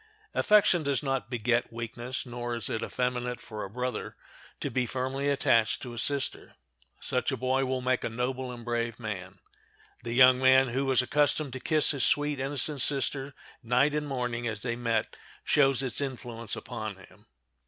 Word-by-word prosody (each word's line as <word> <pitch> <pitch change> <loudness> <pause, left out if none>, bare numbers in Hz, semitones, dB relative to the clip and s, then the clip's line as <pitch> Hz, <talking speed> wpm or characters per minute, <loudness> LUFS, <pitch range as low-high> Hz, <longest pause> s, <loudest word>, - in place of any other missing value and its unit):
Affection 210 -4 +4
does 140 -1 0
not 135 -3 -1
beget 120 0 0
weakness, 120 +3 -5
nor 120 -1 -4
is 115 -4 -4
it 110 - -2
effeminate 125 -1 -2
for 110 -2 -7
a 95 - -6
brother 125 +4 -4 0.4
to - - -3
be 125 -2 0
firmly 130 +3 -2
attached 115 -5 +3
to 125 -3 -7
a 120 - -5
sister. 140 0 -1 0.4
Such - - -1
a - - -2
boy 130 +1 +1
will 130 0 -1
make 130 0 0
a - - -1
noble 125 +2 -3
and 120 -1 -9
brave 120 -1 -2
man. 95 -5 -6 0.6
The 120 -1 -4
young 130 0 +7
man 130 0 +5
who 135 +3 -1
was 130 -1 +4
accustomed 145 0 +1
to 130 - -5
kiss 155 +3 +3
his 140 -4 0
sweet, 145 -1 +3
innocent 140 +1 -1
sister 135 0 0 0.3
night 125 +5 +2
and 150 0 -1
morning 120 -3 -2
as 110 -2 -4
they 120 -2 -2
met 115 -2 -1 0.3
shows 135 -2 +3
its 130 +1 -1
influence 120 -5 -4
upon 110 -4 -6
him. 95 -1 -18
125 Hz, 175 wpm, -29 LUFS, 120-135 Hz, 0.6 s, young